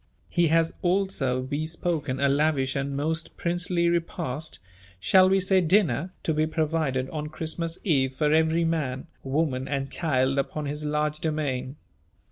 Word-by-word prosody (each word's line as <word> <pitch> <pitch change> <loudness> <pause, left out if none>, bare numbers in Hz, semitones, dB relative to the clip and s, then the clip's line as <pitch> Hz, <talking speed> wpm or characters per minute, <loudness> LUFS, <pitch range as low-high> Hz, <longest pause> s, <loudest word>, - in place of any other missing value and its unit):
He 175 -2 +2
has 165 +1 +2
also 175 -9 0
bespoken 155 0 -2
a 140 - +3
lavish 140 -1 +1
and 140 0 -2
most 160 +3 -2
princely 175 0 0
repast 165 -3 -2 0.4
shall 185 - +5
we 195 0 +4
say 190 0 +3
dinner 170 - +2
to 160 - +1
be 155 +1 +1
provided 155 -5 0
on 150 -1 -4
Christmas 165 +2 -3
eve 135 -7 +1
for 150 +1 +2
every 160 +1 +3
man, 145 -6 -1 0.2
woman, 135 -2 -1
and 140 0 -2
child 135 -4 +1
upon 150 +2 -2
his 150 +1 -3
large 150 0 0
domain. 140 -5 -2
155 Hz, 145 wpm, -26 LUFS, 140-165 Hz, 0.4 s, shall